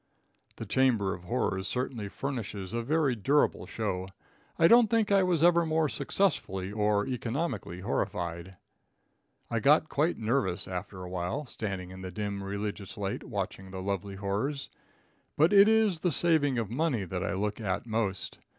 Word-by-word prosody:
The 115 - -6
chamber 110 -4 +2
of 90 - -9
horrors 95 -3 -1
certainly 125 -5 -3
furnishes 105 -7 -5
a 120 - 0
very 145 +2 +1
durable 140 +7 +1
show. 95 -4 -3 0.5
I 165 - +6
don't 235 +3 +7
think 220 -2 +2
I 200 -1 +5
was 175 -4 +2
ever 170 0 +5
more 160 -1 +1
successfully 115 - 0
or 105 -1 +1
economically 125 - -3
horrified. 85 -1 -3 1.0
I 115 - +1
got 150 +6 +4
quite 155 +5 +1
nervous 110 -6 0
after 95 +1 -6
a 90 - -7
while, 90 +10 -2
standing 95 -7 -5
in 95 0 -9
the 95 - -5
dim 100 +1 -4
religious 100 0 -5
light 100 -1 -3
watching 95 -1 -4
the 95 0 -6
lovely 100 0 -3
horrors. 105 +9 -2 0.7
But 160 +6 +4
it 200 0 +8
is 220 -6 +3
the 175 +1 +1
saving 150 -5 +3
of 110 -2 -2
money 135 -5 0
that 90 0 -4
I - - -1
look 105 +3 -2
at 95 -1 -2
most. 110 -5 -2
110 Hz, 160 wpm, -29 LUFS, 95-145 Hz, 1.0 s, it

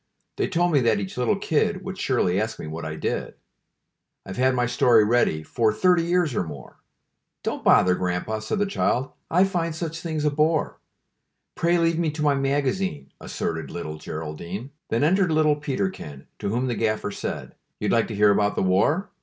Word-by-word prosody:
They - - +1
told 175 -1 +1
me 145 - +4
that 115 -3 +2
each 95 -2 -5
little 125 +11 +1
kid 195 +2 0
Would 190 -1 -5
surely 115 - +1
ask 110 0 -3
me - - -7
what 80 +1 -6
I 80 0 -4
did. - - -3 0.9
"I've 95 - -7
had 130 0 +3
my 125 -1 +2
story 120 -2 +4
ready 105 -8 +2
For 110 +6 +1
thirty 180 - +3
years 170 -3 +1
or 105 - 0
more." 75 -6 -10 0.7
"Don't - - -3
bother, 90 - +5
Grandpa," 90 +4 -2
said 110 - -3
the 205 - +2
child; 135 -9 0 0.2
"I 180 +3 +4
find 170 -4 -1
such 165 0 -4
things 160 -3 -3
a 150 - +3
bore. 155 +2 +1 0.7
Pray 170 +1 +2
leave 165 -1 +2
me 165 -2 +1
to 150 0 -3
my 145 -1 +4
magazine," 140 +5 -1
Asserted 80 0 -4
little 75 -3 -6
Geraldine. 85 - -6 0.2
Then 115 +4 +1
entered 180 +2 +3
little 155 -1 +3
Peterkin, 135 - -4
To - - -2
whom 120 +5 0
the 125 - -1
gaffer 110 -2 -1
said: - - -5 0.3
"You'd - - 0
like 115 -1 +2
to 110 - -5
hear 105 0 +5
about 105 0 +2
the - - 0
war? 145 - +2
130 Hz, 190 wpm, -24 LUFS, 100-165 Hz, 0.9 s, bother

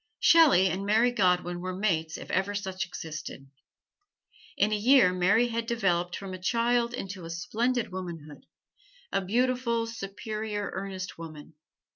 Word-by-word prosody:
Shelley 300 - +6
and 190 +1 -2
Mary 220 +4 +3
Godwin 180 -5 +1
were 185 +1 -4
mates 165 -5 -1
if - - -9
ever 195 +2 0
such 190 -2 -3
existed. 155 -5 -8 1.1
In 210 +2 +2
a - - +2
year 225 -3 +5
Mary 205 +7 +3
had 230 0 -3
developed 180 -7 0
from 195 -1 -7
a 185 - -6
child 235 +3 +1
into 190 -7 -6
splendid 230 +8 -1
womanhood 170 -5 -8 0.6
a - - +1
beautiful, 235 +3 0
superior, 215 -1 -5
earnest 190 -2 -6
woman. 155 -2 -10
195 Hz, 135 wpm, -28 LUFS, 180-230 Hz, 1.1 s, Shelley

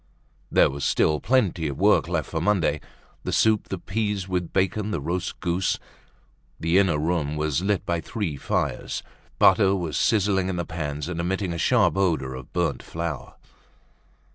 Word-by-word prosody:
There - - +5
was 70 0 -5
still 75 -1 +2
plenty 100 -9 +1
of 70 - -4
work - - +4
left - - -2
for - - -1
Monday: 90 -7 +1 0.4
the - - -3
soup, 110 -2 +3
the 95 - -3
peas 100 0 -2
with 90 -2 -2
bacon, 100 +2 0
the 85 - -1
roast 90 +6 -3
goose. 90 +1 0 0.8
The 85 +4 +3
inner 90 -6 +3
room 75 -1 -1
was 75 0 0
lit 100 0 0
by 85 -1 -1
three 100 - -3
fires. 70 - -2 0.3
Butter 95 0 +5
was 85 -5 -3
sizzling 95 -3 +2
in 95 - -2
the 85 -1 -2
pans 75 -3 -4
and 85 -2 -4
emitting 95 +1 -1
a 85 - -4
sharp 95 - +3
odor 80 -9 +1
of 65 -1 -9
burnt - - -1
flour. 85 -4 -5
90 Hz, 165 wpm, -25 LUFS, 80-95 Hz, 0.8 s, There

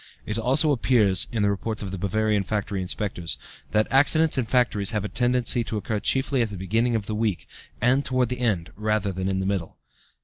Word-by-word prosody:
It 105 +1 -2
also 135 +6 +3
appears 110 -7 +2
(in 110 -3 0
the 100 - +3
reports 110 +2 -3
of 95 - -5
the 95 - -5
Bavarian 105 +2 +1
factory 100 -1 -2
inspectors) 90 -2 -3 0.3
that 105 0 +2
accidents 155 +4 +4
in 130 -3 +1
factories 115 -5 +1
have 105 -2 -2
a - - -1
tendency 125 0 +1
to 110 - -3
occur 105 0 -2
chiefly 135 +3 +1
at 115 - 0
the 100 - -7
beginning 115 +6 0
of 110 -3 -2
the 110 - -4
week, 105 -4 -1 0.3
and 130 +4 +3
toward 130 -3 0
the 125 0 -4
end 105 -9 -1
rather 105 -1 0
than 95 +1 -3
in 95 - -1
the 95 - -1
middle. 95 -4 -3
110 Hz, 210 wpm, -25 LUFS, 100-125 Hz, 0.3 s, accidents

